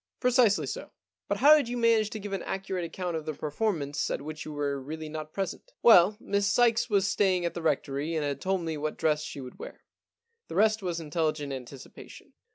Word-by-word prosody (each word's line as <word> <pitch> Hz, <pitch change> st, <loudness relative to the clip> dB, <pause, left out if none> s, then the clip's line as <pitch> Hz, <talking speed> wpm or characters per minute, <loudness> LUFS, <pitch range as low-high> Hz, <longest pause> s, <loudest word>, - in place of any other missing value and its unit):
* -, -, -62 dB
Precisely 245 Hz, -4 st, +3 dB
so.' -, -, -6 dB, 0.2 s
* -, -, -65 dB
But -, -, 0 dB
how 295 Hz, +3 st, +9 dB
did 285 Hz, -6 st, +1 dB
you 245 Hz, -, -3 dB
manage 230 Hz, -3 st, +3 dB
to 215 Hz, -, -6 dB
give 205 Hz, -1 st, -6 dB
an 195 Hz, -, -2 dB
accurate 190 Hz, -2 st, -3 dB
account 175 Hz, +1 st, -4 dB
of 160 Hz, -1 st, -5 dB
the 155 Hz, -, -3 dB
performance 150 Hz, -2 st, -2 dB
at -, -, -3 dB
which 155 Hz, +1 st, -7 dB
you 155 Hz, -, -6 dB
were 145 Hz, -2 st, -2 dB
really 155 Hz, +3 st, -6 dB
not 155 Hz, 0 st, -6 dB
present? 195 Hz, -, -5 dB
' -, -, -63 dB
* -, -, -51 dB
Well, 210 Hz, -2 st, +7 dB
Miss 200 Hz, -2 st, 0 dB
Sykes 235 Hz, +2 st, +3 dB
was 200 Hz, -2 st, +3 dB
staying 185 Hz, -4 st, +2 dB
at 170 Hz, -, -1 dB
the 170 Hz, -, -5 dB
Rectory 150 Hz, 0 st, -1 dB
and 155 Hz, -2 st, 0 dB
had 140 Hz, -1 st, -3 dB
told 190 Hz, -1 st, 0 dB
me 160 Hz, -2 st, -3 dB
what 150 Hz, +1 st, -3 dB
dress 155 Hz, -2 st, +1 dB
she 145 Hz, -2 st, -7 dB
would 125 Hz, -1 st, -10 dB
wear. -, -, -9 dB, 0.7 s
The -, -, -7 dB
rest 215 Hz, +1 st, +3 dB
was 175 Hz, -3 st, -2 dB
intelligent 155 Hz, -2 st, -2 dB
anticipation. 130 Hz, 0 st, -11 dB
170 Hz, 230 wpm, -28 LUFS, 150-210 Hz, 0.7 s, how